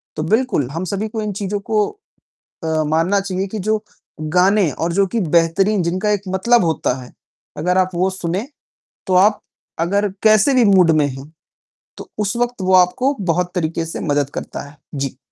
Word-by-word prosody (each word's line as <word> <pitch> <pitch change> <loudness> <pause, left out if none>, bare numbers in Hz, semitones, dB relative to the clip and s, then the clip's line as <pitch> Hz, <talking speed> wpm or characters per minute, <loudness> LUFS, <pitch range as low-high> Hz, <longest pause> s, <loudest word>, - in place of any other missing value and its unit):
तो 155 - -2
बिल्कुल, 215 - +1
हम 165 +4 -4
सभी 200 +4 -2
को 220 0 -4
इन 210 -1 -3
चीज़ों 200 +1 -3
को 210 0 0 0.8
अ, 160 -1 0
मानना 165 +6 +1
चाहिए 190 0 -3
कि 215 - -5
जो 215 +2 -1 0.4
गाने 180 +3 +2
और 170 +5 -2
जो 195 +2 +2
की 230 +4 -2
बेहतरीन, 175 +4 +2
जिनका 185 +5 -1
एक 205 -2 0
मतलब 190 +3 +3
होता 160 -6 0
है, 125 - -13 0.5
अगर 180 +4 +1
आप 185 0 +2
वो 185 +2 +1
सुने, 185 +4 -3 0.6
तो 185 - +1
आप 205 +3 +4 0.4
अगर 200 +4 +1
कैसे 215 +5 +5
भी 250 -2 +5
मूड 185 -5 +5
में 145 - +2
हो, 135 +2 -10 0.7
तो - - -10
उस 210 +2 -1
वक़्त 245 -3 -1
वो 185 0 +1
आपको 215 +10 +3
बहुत 180 0 0
तरीके 165 -1 -1
से 165 - -6
मदद 145 -3 0
करता - - -5
है। 145 - -19 0.2
जी। 135 -2 -3
185 Hz, 185 wpm, -19 LUFS, 165-210 Hz, 0.8 s, कैसे